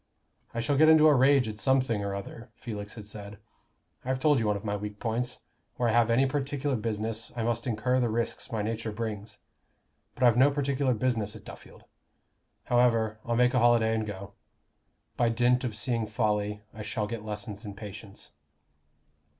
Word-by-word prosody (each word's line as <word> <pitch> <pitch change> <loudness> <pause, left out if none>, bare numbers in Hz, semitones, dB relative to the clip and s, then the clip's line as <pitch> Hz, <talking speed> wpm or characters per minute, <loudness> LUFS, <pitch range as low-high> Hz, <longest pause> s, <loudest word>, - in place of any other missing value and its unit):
"I 115 - -3
shall 135 +4 0
get 155 +2 +6
into 160 -1 +7
a 150 - +6
rage 135 -1 +4
at 105 -1 -6
something 130 -5 +2
or 100 -1 -2
other," 115 +4 -8
Felix 105 -3 -7
had 110 -3 -9
said. 105 0 -9 0.7
"I've 130 +1 -1
told 145 -1 +3
you 110 - 0
one 105 -1 +1
of 100 - -10
my 105 0 -1
weak 105 0 -6
points. 120 +2 -2 0.3
Where 120 -1 +1
I - - +3
have 120 0 +3
any 120 +4 +4
particular 140 0 -1
business, 110 0 -3
I 115 - -2
must 115 +1 -1
incur 125 +3 +1
the 120 -2 +1
risks 115 +3 -2
my 110 -2 -1
nature 110 0 -3
brings. 105 -1 -5 0.8
But - - -3
I've 120 -2 +5
no 135 +3 +6
particular 140 -2 0
business 110 -3 -1
at 110 - -12
Duffield. - - -13 0.8
However, 115 -3 +2
I'll 115 - -1
make 125 +2 +3
a 125 - +3
holiday 115 -2 +4
and 110 -1 -1
go. 100 -1 -7 0.8
By 120 - +3
dint 125 +2 +2
of 120 -4 -3
seeing 115 0 -1
folly, 105 -1 -1
I 105 - -8
shall 110 0 -2
get 110 0 -5
lessons 105 0 -6
in 100 -2 -7
patience." 100 -1 -9
115 Hz, 185 wpm, -28 LUFS, 105-125 Hz, 0.8 s, into